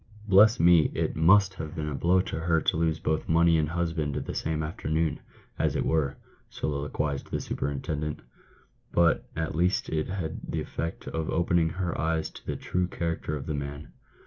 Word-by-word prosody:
" 105 +1 -18
Bless 105 +4 +6
me, 85 -2 +6
it - - -1
must 95 +5 +5
have 80 -4 -7
been 75 -1 -3
a 75 - -3
blow 90 +6 +3
to 80 - -4
her 80 0 +2
to - - 0
lose 80 -1 +1
both 80 0 -2
money 85 0 +5
and 75 -1 +1
husband 80 -3 -1
the - - -4
same 80 -1 -2
afternoon, 80 -2 -1 0.4
as - - +1
it - - 0
were," 80 -4 +1 0.3
soliloquised 70 0 -3
the - - -2
super - - -3
intendent. 75 +2 -3 0.4
" - - -30 0.3
But 85 -1 +2
at 80 0 -2
least 90 +4 +1
it 75 -1 -1
had 90 -4 -4
the - - -1
effect 80 - -5
of 80 -1 -3
opening 85 -1 +2
her 90 0 -3
eyes 80 0 0
to - - -13
the - - -3
true 90 0 -1
character 85 -3 -3
of 70 -2 -6
the 75 - -2
man." 70 +1 -5
80 Hz, 195 wpm, -27 LUFS, 75-85 Hz, 0.4 s, Bless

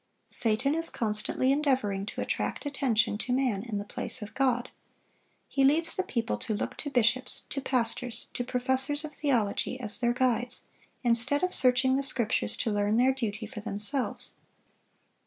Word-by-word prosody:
Satan 235 +5 +1
is 330 +1 0
constantly 220 +4 +2
endeavoring 255 -9 0
to - - -4
attract - - -2
attention 240 -7 +1
to 245 - -4
man 250 -6 +1
in 220 -2 -4
the 200 - -3
place 220 +2 -4
of 210 - -9
God. 250 -2 0 0.8
He 275 - +1
leads 320 +5 +4
the - - +1
people 235 -11 -2
to 215 - -2
look - - -3
to 290 - -4
bishops, 250 0 +1
to 275 - -3
pastors, 245 -2 -1
to 245 - -2
professors 260 +4 0
of 300 - -8
theology, 250 -3 0
as 210 -4 -1
their 240 -1 +2
guides, 250 -1 0 0.4
instead 240 +5 +2
of 365 - +1
searching 260 +1 +5
the - - +1
Scriptures 250 -4 0
to 225 - -1
learn 205 +1 +1
their 255 +2 +4
duty 225 -4 -3
for 215 - -8
themselves. 215 +5 0
250 Hz, 165 wpm, -29 LUFS, 220-270 Hz, 0.8 s, searching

